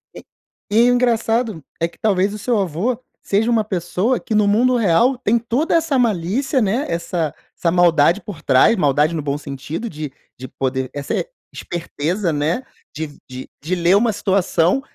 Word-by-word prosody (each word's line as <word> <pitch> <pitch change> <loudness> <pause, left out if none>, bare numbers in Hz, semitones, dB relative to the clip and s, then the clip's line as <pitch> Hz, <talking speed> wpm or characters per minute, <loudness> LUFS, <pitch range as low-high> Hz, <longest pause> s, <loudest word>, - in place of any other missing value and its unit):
E - - -10 0.5
e 235 +3 +5
o - - +4
engraçado 230 - +1 0.2
é 165 - +2
que 170 - -19
talvez 200 -1 +1
o - - -5
seu 230 +2 0
avô 195 +7 -1 0.2
seja 220 +4 +1
uma 225 -2 +3
pessoa 190 +5 -1
que, - - -4
no 210 -1 +3
mundo 245 +5 +3
real, 230 +5 +3
tem 235 -2 +1
toda 240 +9 0
essa 320 -5 +2
malícia, 240 - +1
né, 225 +7 0
essa 170 -2 -2 0.2
essa 170 - +1
maldade 170 +1 +4
por 190 -7 -9
trás, 135 - +4
maldade 150 0 +2
no 160 - -2
bom 140 0 -2
sentido 145 - -6
de 150 -5 -6 0.3
de 130 - -7
poder, 130 -1 -3
essa 140 -1 -4 0.4
esperteza, 175 +2 -3
né, 155 - -1 0.3
de 150 -1 -6
de 130 0 -8
de 165 +6 -1
ler 175 +1 +3
uma 220 +2 +3
situação 190 +2 +1
190 Hz, 175 wpm, -19 LUFS, 160-230 Hz, 0.5 s, e